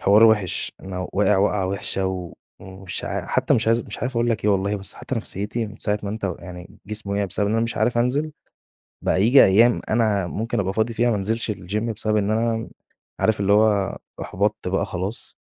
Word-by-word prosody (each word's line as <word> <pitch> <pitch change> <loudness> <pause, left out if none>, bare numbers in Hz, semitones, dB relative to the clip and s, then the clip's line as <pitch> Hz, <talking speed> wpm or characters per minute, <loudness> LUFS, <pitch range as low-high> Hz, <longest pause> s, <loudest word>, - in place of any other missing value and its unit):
حوار 105 +3 +6
وحش، 105 -5 +2
أنا 90 -1 -5
واقع 105 +1 +3
وقعة 100 -1 +1
وحشة 95 0 -1
و 90 -2 -4 0.3
ومش 95 -1 -6
عا - - -3
حتى - - +2
مش 110 - 0
عايز 115 +1 +3
مش - - -7
عارف 130 - -2
أقول 120 +1 +2
لك 115 - -2
إيه 105 - +4
والله 100 +1 +1
بس 95 -1 -3
حتى 130 - -5
نفسيتي 110 +1 -2
من 105 0 -11
ساعة 105 0 0
ما 100 - -3
أنت 110 0 -5
ويعني 90 -1 -7
جسمي 105 -1 -3
وقع 100 0 +1
بسبب 100 +2 -1
إن 105 - 0
أنا 115 - +2
مش 115 - -3
عارف 120 -1 +1
أنزل، 140 +6 0 0.7
بقى 95 - +2
ييجي 125 +5 +7
أيام 115 +5 +5
أنا 110 -5 +2
ممكن 110 +4 -2
أبقى 95 0 -1
فاضي 110 +2 0
فيها 120 +2 +2
ما 115 - +1
أنزلش 110 +3 -1
الGym 95 0 -4 0.2
بسبب 110 0 0
إن 105 +1 +1
أنا 115 +1 +1
م 115 - -6 0.5
عارف 110 -1 +2
اللي 100 0 +3
هو 105 -2 +3 0.2
أحبطت 100 0 -1
بقى 95 +1 0
خلاص، 95 +3 -5
105 Hz, 215 wpm, -23 LUFS, 95-115 Hz, 0.7 s, ييجي